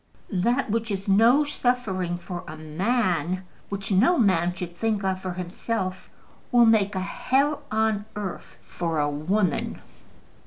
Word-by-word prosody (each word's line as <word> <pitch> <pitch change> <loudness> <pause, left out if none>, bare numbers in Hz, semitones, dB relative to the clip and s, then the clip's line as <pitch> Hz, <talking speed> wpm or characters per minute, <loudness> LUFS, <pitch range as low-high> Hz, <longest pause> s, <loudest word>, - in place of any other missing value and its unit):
"That 235 +6 +1
which 230 +1 -1
is 195 -1 -3
no 230 +9 +5
suffering 235 -11 -1
for 175 0 -7
a 155 0 -7
man, 185 +1 0 0.3
which 200 0 -4
no 240 - +4
man 185 - +3
should 175 -2 -6
think 215 0 -1
of 190 -1 -1
for 185 -1 -3
himself, 185 +2 -4 0.4
will 240 -1 +6
make 210 -3 +3
a - - 0
hell 275 +9 0
on 220 -1 +1
earth 205 -3 -6
for 165 -2 -3
a 145 -1 +2
woman." 170 +7 0
195 Hz, 145 wpm, -25 LUFS, 180-230 Hz, 0.4 s, will